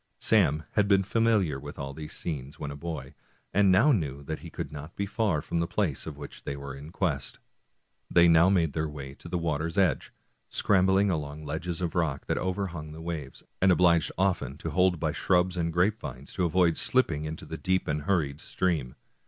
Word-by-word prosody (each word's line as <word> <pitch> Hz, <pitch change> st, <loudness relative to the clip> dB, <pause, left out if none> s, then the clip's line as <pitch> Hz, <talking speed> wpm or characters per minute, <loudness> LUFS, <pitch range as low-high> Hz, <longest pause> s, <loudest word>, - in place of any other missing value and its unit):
Sam 75 Hz, +3 st, +3 dB
had 105 Hz, -1 st, +2 dB
been 100 Hz, -1 st, +4 dB
fa 100 Hz, +4 st, -1 dB
miliar 100 Hz, -12 st, +2 dB
with 70 Hz, +1 st, -8 dB
all 70 Hz, 0 st, -5 dB
these 75 Hz, +1 st, -8 dB
scenes 70 Hz, -4 st, -5 dB
when 70 Hz, -, -4 dB
a -, -, -6 dB
boy, 80 Hz, +2 st, -6 dB, 0.4 s
and 100 Hz, -1 st, +5 dB
now 115 Hz, +12 st, +5 dB
knew 70 Hz, -, -1 dB
that 80 Hz, +2 st, -4 dB
he -, -, -9 dB
could -, -, -6 dB
not 75 Hz, +2 st, -8 dB
be 100 Hz, -, -1 dB
far 100 Hz, -7 st, 0 dB
from 85 Hz, -, -2 dB
the 85 Hz, -, 0 dB
place 85 Hz, -8 st, -1 dB
of 75 Hz, -3 st, -6 dB
which 75 Hz, -1 st, -9 dB
they 70 Hz, -, -4 dB
were 70 Hz, -1 st, -7 dB
in 70 Hz, +3 st, -10 dB
quest. 75 Hz, -8 st, -2 dB, 0.7 s
They 85 Hz, 0 st, +6 dB
now 85 Hz, +2 st, +6 dB
made 85 Hz, -6 st, +2 dB
their 80 Hz, -1 st, -1 dB
way 70 Hz, -2 st, -8 dB
to 85 Hz, -, -12 dB
the 90 Hz, -, -1 dB
water's 80 Hz, +1 st, -2 dB
edge, 95 Hz, -7 st, +2 dB, 0.4 s
scrambling 95 Hz, 0 st, +3 dB
along 75 Hz, -2 st, -4 dB
ledges 85 Hz, +3 st, -3 dB
of 85 Hz, -2 st, -1 dB
rocks 80 Hz, -6 st, -1 dB
that -, -, -1 dB
overhung 90 Hz, -5 st, -3 dB
the 80 Hz, -, -9 dB
waves, 80 Hz, -5 st, -6 dB, 0.2 s
and 95 Hz, 0 st, +6 dB
obliged 85 Hz, -2 st, +4 dB
often 90 Hz, -8 st, 0 dB
to 80 Hz, 0 st, -5 dB
hold 90 Hz, +1 st, +3 dB
by -, -, 0 dB
shrubs 90 Hz, 0 st, +2 dB
and 85 Hz, -2 st, -1 dB
grapevines 85 Hz, -, -1 dB
to 90 Hz, -, 0 dB
avoid 85 Hz, -1 st, +3 dB
slipping 80 Hz, -, +1 dB
into 80 Hz, +1 st, -6 dB
the -, -, -6 dB
deep 95 Hz, 0 st, 0 dB
and 75 Hz, 0 st, -1 dB
hurried 75 Hz, -4 st, 0 dB
stream. 80 Hz, -9 st, -1 dB
85 Hz, 205 wpm, -28 LUFS, 75-95 Hz, 0.7 s, They